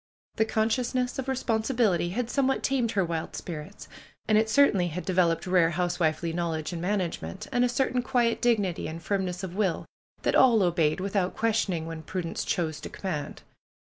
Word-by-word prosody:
The 220 Hz, -, +3 dB
consciousness 245 Hz, +3 st, 0 dB
of 265 Hz, -, -3 dB
responsibility 225 Hz, -7 st, +1 dB
had 230 Hz, +6 st, -2 dB
somewhat 270 Hz, +1 st, +1 dB
tamed 250 Hz, -4 st, +1 dB
her 195 Hz, -3 st, +2 dB
wild 165 Hz, -1 st, -4 dB
spirits. 155 Hz, -3 st, -7 dB, 0.4 s
And 215 Hz, -, +3 dB
it 220 Hz, +1 st, +3 dB
certainly 215 Hz, -8 st, +4 dB
had 175 Hz, +2 st, -5 dB
developed 175 Hz, -3 st, +2 dB
rare 180 Hz, -3 st, +4 dB
housewifely 170 Hz, -1 st, 0 dB
knowl 170 Hz, -1 st, -1 dB
edge 155 Hz, +2 st, -4 dB
and 165 Hz, -, -4 dB
management, 190 Hz, +1 st, -2 dB
and 245 Hz, -, +2 dB
a 250 Hz, -, +3 dB
certain 255 Hz, 0 st, +1 dB
quiet 240 Hz, -2 st, +1 dB
dignity 210 Hz, -7 st, +1 dB
and 160 Hz, +1 st, -6 dB
firmness 185 Hz, 0 st, -2 dB
of 185 Hz, -1 st, -5 dB
will 195 Hz, -4 st, 0 dB, 0.4 s
that -, -, +1 dB
all 235 Hz, -6 st, +5 dB
obeyed 170 Hz, -2 st, +2 dB
without 190 Hz, -1 st, -1 dB
questioning 210 Hz, -7 st, 0 dB
when 165 Hz, -1 st, -6 dB
Prudence 165 Hz, +1 st, -4 dB
chose 160 Hz, -3 st, -1 dB
to -, -, -7 dB
command. 165 Hz, -7 st, -5 dB
190 Hz, 170 wpm, -27 LUFS, 170-230 Hz, 0.4 s, all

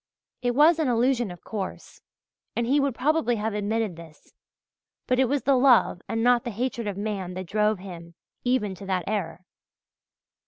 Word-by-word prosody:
It 245 Hz, -1 st, 0 dB
was 315 Hz, +4 st, +5 dB
an 310 Hz, -, +1 dB
illusion, 245 Hz, -1 st, +2 dB
of 175 Hz, -1 st, -11 dB
course, 200 Hz, -4 st, -6 dB, 0.5 s
and 235 Hz, -, 0 dB
he 275 Hz, +5 st, +3 dB
would 275 Hz, -3 st, 0 dB
probably 295 Hz, -2 st, +1 dB
have 215 Hz, 0 st, -2 dB
admitted 210 Hz, -1 st, -1 dB
this; 165 Hz, -2 st, -15 dB, 0.7 s
but 255 Hz, 0 st, +1 dB
it 265 Hz, -, +5 dB
was 285 Hz, 0 st, 0 dB
the 275 Hz, -, +3 dB
love 250 Hz, -8 st, +4 dB
and 225 Hz, 0 st, -1 dB
not 245 Hz, -1 st, +4 dB
the -, -, -3 dB
hatred 235 Hz, 0 st, -3 dB
of 200 Hz, -2 st, -3 dB
man 200 Hz, -3 st, -4 dB
that 185 Hz, 0 st, -5 dB
drove 210 Hz, +3 st, +1 dB
him 170 Hz, -3 st, -10 dB, 0.3 s
even 245 Hz, -6 st, +1 dB
to 190 Hz, +1 st, -10 dB
that 185 Hz, -2 st, 0 dB
error. 185 Hz, -4 st, -3 dB
225 Hz, 180 wpm, -26 LUFS, 195-250 Hz, 0.7 s, was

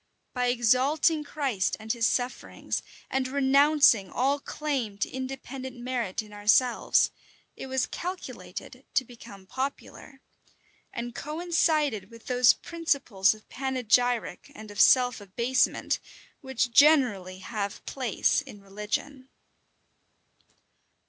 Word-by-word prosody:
By 250 Hz, -1 st, 0 dB
exalting 260 Hz, +6 st, +2 dB
Christ 275 Hz, -10 st, -1 dB
and 220 Hz, +1 st, -2 dB
his 230 Hz, -2 st, +1 dB
sufferings, 250 Hz, 0 st, -3 dB, 0.3 s
and 265 Hz, -1 st, -1 dB
renouncing 275 Hz, -5 st, +4 dB
all 275 Hz, +3 st, 0 dB
claim 275 Hz, -9 st, -3 dB
to -, -, -1 dB
independent 260 Hz, 0 st, -6 dB
merit 240 Hz, -5 st, -3 dB
in 210 Hz, -1 st, -15 dB
ourselves, 215 Hz, +4 st, +3 dB, 0.4 s
it -, -, -8 dB
was 260 Hz, -1 st, 0 dB
calculated 360 Hz, +1 st, -7 dB
to 260 Hz, -, +2 dB
become 225 Hz, -5 st, -13 dB
popular, 270 Hz, +3 st, -6 dB, 0.7 s
and 240 Hz, 0 st, -5 dB
coincided 305 Hz, -, 0 dB
with 230 Hz, -1 st, -15 dB
those 250 Hz, -1 st, +5 dB
principles 275 Hz, -, 0 dB
of 215 Hz, -, -19 dB
panegyric 245 Hz, -1 st, 0 dB
and 215 Hz, -1 st, -10 dB
of 205 Hz, -, 0 dB
self 245 Hz, -3 st, +5 dB
abasement 235 Hz, +6 st, 0 dB, 0.4 s
which 265 Hz, -3 st, -2 dB
generally 235 Hz, -10 st, +4 dB
have 200 Hz, 0 st, -5 dB
place 255 Hz, -7 st, 0 dB
in 205 Hz, -, -12 dB
religion. 210 Hz, +7 st, -5 dB
250 Hz, 110 wpm, -27 LUFS, 220-275 Hz, 0.7 s, those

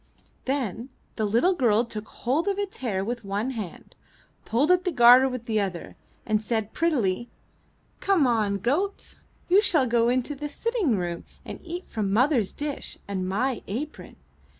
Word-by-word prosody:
Then 255 Hz, -3 st, -2 dB, 0.3 s
the 220 Hz, -, 0 dB
little 235 Hz, -, +3 dB
girl 235 Hz, -, +2 dB
took 215 Hz, -2 st, -6 dB
hold 290 Hz, +10 st, -1 dB
of 400 Hz, -1 st, 0 dB
its 405 Hz, -1 st, -3 dB
hair 195 Hz, -7 st, -2 dB
with 240 Hz, +1 st, -4 dB
one 205 Hz, +6 st, -2 dB
hand, 215 Hz, -8 st, -7 dB, 0.5 s
pulled 275 Hz, +9 st, +2 dB
at 360 Hz, 0 st, +4 dB
the 365 Hz, -, 0 dB
garter 250 Hz, -1 st, +7 dB
with 250 Hz, -2 st, -6 dB
the 220 Hz, -2 st, 0 dB
other, 185 Hz, -4 st, -5 dB, 0.3 s
and 215 Hz, -1 st, +1 dB
said 220 Hz, -1 st, -2 dB
prettily: 240 Hz, -, 0 dB, 0.7 s
"Come 385 Hz, -6 st, +3 dB
now, 225 Hz, -5 st, +2 dB
goat, 275 Hz, -, -1 dB, 0.3 s
you 380 Hz, +3 st, +5 dB
shall 315 Hz, -10 st, +3 dB
go 235 Hz, -1 st, +2 dB
into 255 Hz, +3 st, 0 dB
the 295 Hz, +1 st, -5 dB
sitting 400 Hz, -, 0 dB
room 175 Hz, -2 st, -3 dB, 0.2 s
and -, -, -7 dB
eat 350 Hz, +1 st, -6 dB
from 205 Hz, -3 st, -2 dB
mother's 245 Hz, -1 st, +2 dB
dish 290 Hz, -1 st, -5 dB
and 190 Hz, -2 st, -3 dB
my 245 Hz, +5 st, 0 dB
apron." 270 Hz, +10 st, -6 dB
240 Hz, 165 wpm, -26 LUFS, 215-295 Hz, 0.7 s, garter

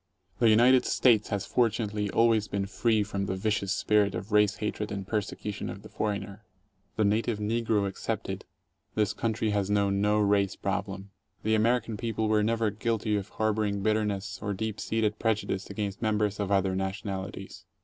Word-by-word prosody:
The 115 Hz, -, +5 dB
United 125 Hz, +4 st, +6 dB
States 115 Hz, -5 st, +3 dB
has 100 Hz, -2 st, -2 dB
fortunately 105 Hz, -3 st, 0 dB
always 115 Hz, -1 st, +3 dB
been 100 Hz, -1 st, -2 dB
free 110 Hz, +1 st, +1 dB
from 100 Hz, -1 st, -3 dB
the 95 Hz, -, -1 dB
vicious 100 Hz, -1 st, -1 dB
spirit 100 Hz, 0 st, +2 dB
of 95 Hz, +4 st, -6 dB
race 105 Hz, -1 st, +4 dB
hatred 105 Hz, 0 st, -3 dB
and 100 Hz, -2 st, -4 dB
persecution 105 Hz, -1 st, -3 dB
of 100 Hz, -, -8 dB
the 110 Hz, -, -11 dB
foreigner. 100 Hz, 0 st, -3 dB, 0.5 s
The 110 Hz, -, +2 dB
native 110 Hz, +2 st, +1 dB
negro 110 Hz, -1 st, 0 dB
excepted, 95 Hz, -, -4 dB, 0.5 s
this 105 Hz, -2 st, +1 dB
country 110 Hz, -1 st, -1 dB
has 100 Hz, -1 st, 0 dB
known 100 Hz, -1 st, +2 dB
no 105 Hz, +1 st, +3 dB
race 100 Hz, -2 st, +2 dB
problem. 100 Hz, 0 st, -3 dB, 0.3 s
The 110 Hz, -, +1 dB
American 115 Hz, 0 st, +1 dB
people 110 Hz, -1 st, -1 dB
were 110 Hz, -1 st, +3 dB
never 110 Hz, 0 st, +1 dB
guilty 110 Hz, 0 st, -1 dB
of 100 Hz, 0 st, -3 dB
harboring 105 Hz, -2 st, 0 dB
bitterness 105 Hz, -2 st, -1 dB
or. 100 Hz, -2 st, -2 dB
deep 110 Hz, +1 st, -3 dB
seated 110 Hz, -1 st, -1 dB
prejudice 105 Hz, -3 st, -1 dB
against 100 Hz, -1 st, -4 dB
members 105 Hz, -2 st, 0 dB
of 100 Hz, -1 st, -2 dB
other 95 Hz, -1 st, +2 dB
nationalities. 95 Hz, 0 st, -5 dB
105 Hz, 165 wpm, -28 LUFS, 100-110 Hz, 0.5 s, United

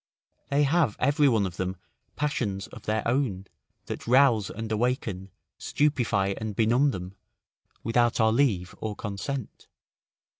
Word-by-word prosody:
They 140 Hz, +1 st, +3 dB
have 140 Hz, -6 st, +2 dB
every 145 Hz, +2 st, +3 dB
one 110 Hz, -5 st, +2 dB
of 90 Hz, -2 st, -6 dB
them 95 Hz, 0 st, -2 dB, 0.4 s
passions 110 Hz, -9 st, -1 dB
of -, -, -13 dB
their 110 Hz, 0 st, 0 dB
own, 120 Hz, -7 st, 0 dB, 0.4 s
that -, -, -6 dB
rouse 120 Hz, -5 st, +4 dB
and 110 Hz, +1 st, -6 dB
awaken, 110 Hz, -4 st, -1 dB, 0.3 s
stupefy 120 Hz, -10 st, +1 dB
and 110 Hz, -2 st, -4 dB
benumb 120 Hz, +7 st, +3 dB
them, 90 Hz, -6 st, -5 dB, 0.7 s
without 120 Hz, +1 st, +2 dB
our 110 Hz, 0 st, +4 dB
leave 110 Hz, -9 st, +1 dB
or 110 Hz, -1 st, -4 dB
consent. 105 Hz, +5 st, -5 dB
115 Hz, 135 wpm, -27 LUFS, 100-135 Hz, 0.7 s, rouse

